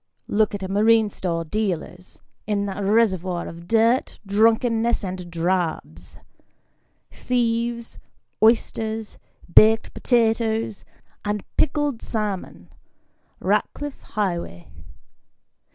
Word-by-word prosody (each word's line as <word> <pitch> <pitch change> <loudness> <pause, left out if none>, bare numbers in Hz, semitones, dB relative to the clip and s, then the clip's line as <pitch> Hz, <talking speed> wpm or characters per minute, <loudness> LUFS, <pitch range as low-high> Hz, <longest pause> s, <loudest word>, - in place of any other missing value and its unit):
Look 210 0 +1
at 200 - -6
a - - -3
marine 215 +2 +3
store 165 -3 -3
dealer's 180 -1 -4 0.2
in 205 -1 0
that 200 0 -4
reservoir 190 -4 +1
of 170 +1 -10
dirt, 230 +4 +2
drunkenness, 225 +3 +2
and 180 -2 -5
drabs: 165 - -2 0.9
thieves, 235 -1 -2 0.4
oysters, 220 -1 +1 0.3
baked 220 +1 +6
potatoes, 225 -3 0 0.4
and 210 -1 -2
pickled 290 -4 0
salmon 210 -4 -4 0.7
Ratcliff 290 -1 -1
Highway. 170 - -4
215 Hz, 90 wpm, -23 LUFS, 185-230 Hz, 0.9 s, baked